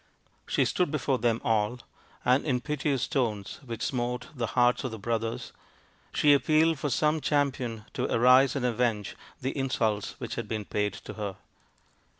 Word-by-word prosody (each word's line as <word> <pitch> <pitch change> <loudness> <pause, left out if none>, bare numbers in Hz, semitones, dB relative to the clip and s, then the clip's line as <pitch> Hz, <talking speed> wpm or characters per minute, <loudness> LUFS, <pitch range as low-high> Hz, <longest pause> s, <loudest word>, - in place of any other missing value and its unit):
She - - +2
stood 180 -3 +1
before 140 -3 0
them 115 -1 +1
all, 110 +1 +1 0.4
and 125 +3 +4
in 130 -5 +1
piteous 140 -1 -1
tones 110 -7 -2
which 115 -3 -5
smote 125 -1 -2
the 120 -5 -2
hearts 120 0 +4
of 130 - -2
the 110 - -6
brothers 115 +2 -3 0.6
she 145 -1 +5
appealed 155 +2 +3
for 145 - -1
some 150 +4 +1
champion 130 -7 0
to - - -2
arise 125 +3 +5
and 130 -3 -1
avenge 115 -4 0 0.3
the 130 - -2
insults 115 -7 -1
which - - -5
had 115 -2 -4
been 110 -2 -3
paid 105 -1 -1
to - - -9
her. 100 -2 -3
125 Hz, 160 wpm, -28 LUFS, 115-140 Hz, 0.6 s, she